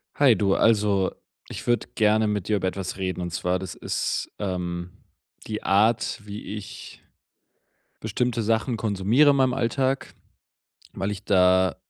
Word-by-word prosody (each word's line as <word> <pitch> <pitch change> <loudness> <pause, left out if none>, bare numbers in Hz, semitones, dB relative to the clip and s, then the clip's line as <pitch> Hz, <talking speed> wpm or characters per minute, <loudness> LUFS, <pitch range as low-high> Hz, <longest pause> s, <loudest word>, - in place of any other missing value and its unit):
Hi, 135 -5 +5
du, 100 0 +1
also, 105 -4 +2 0.3
ich - - -8
würde 120 -2 +1
gerne 110 -1 +3
mit 105 -3 -2
dir 110 - +2
über 95 - -1
etwas 95 0 -4
reden. 95 -1 -3
Und 90 - -3
zwar, 90 +2 -1
das 95 -2 -7
ist, - - -2
ähm, 90 -2 -3 0.6
die 105 -1 -4
Art, 110 +3 +2
wie 105 0 -7
ich 105 -1 -10 1.0
bestimmte 115 +2 -1
Sachen 115 +3 0
konsumiere 110 +7 +3
in 140 - +3
meinem 130 -2 +2
Alltag, 135 +2 -1 0.8
weil 95 - -2
ich 100 -1 -5
da 95 -2 +3
105 Hz, 145 wpm, -25 LUFS, 95-115 Hz, 1.0 s, Hi